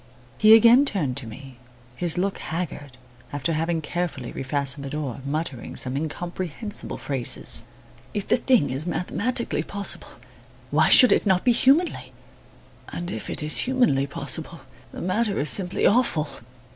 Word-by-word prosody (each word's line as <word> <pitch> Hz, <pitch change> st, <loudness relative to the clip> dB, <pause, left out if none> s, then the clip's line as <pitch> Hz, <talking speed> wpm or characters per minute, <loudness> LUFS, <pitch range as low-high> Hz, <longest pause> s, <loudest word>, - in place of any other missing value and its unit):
He 215 Hz, +1 st, +8 dB
again 235 Hz, +4 st, +6 dB
turned 165 Hz, -, -1 dB
to 130 Hz, -5 st, -4 dB
me, 130 Hz, +3 st, -11 dB, 0.4 s
his 175 Hz, +5 st, -1 dB
look 195 Hz, +2 st, -1 dB
haggard, 150 Hz, -6 st, -6 dB, 0.3 s
after 145 Hz, +3 st, -2 dB
having 165 Hz, +1 st, -1 dB
carefully 155 Hz, -6 st, -4 dB
refastened 140 Hz, +1 st, -2 dB
the 140 Hz, -, -5 dB
door, 140 Hz, -4 st, -4 dB
muttering 140 Hz, -3 st, -4 dB
some 130 Hz, 0 st, +1 dB
incomprehensible 175 Hz, +6 st, -5 dB
phrases. 135 Hz, -4 st, +2 dB, 0.5 s
"If 205 Hz, -, -4 dB
the -, -, +3 dB
thing 240 Hz, -, +2 dB
is 140 Hz, +6 st, -2 dB
mathematically 225 Hz, +7 st, -2 dB
possible, 200 Hz, -1 st, -2 dB, 0.6 s
why -, -, +3 dB
should 250 Hz, -, +7 dB
it -, -, +2 dB
not 185 Hz, -2 st, +2 dB
be 250 Hz, -, +5 dB
humanly! 275 Hz, +9 st, +2 dB, 0.8 s
And 175 Hz, +1 st, -5 dB
if -, -, -6 dB
it -, -, -2 dB
is 150 Hz, -, -1 dB
humanly 245 Hz, -, +1 dB
possible, 140 Hz, -, -2 dB, 0.3 s
the -, -, -8 dB
matter 200 Hz, +3 st, -1 dB
is 145 Hz, -1 st, +1 dB
simply 185 Hz, -2 st, +1 dB
awful." 200 Hz, -10 st, +2 dB
170 Hz, 145 wpm, -24 LUFS, 140-205 Hz, 0.8 s, He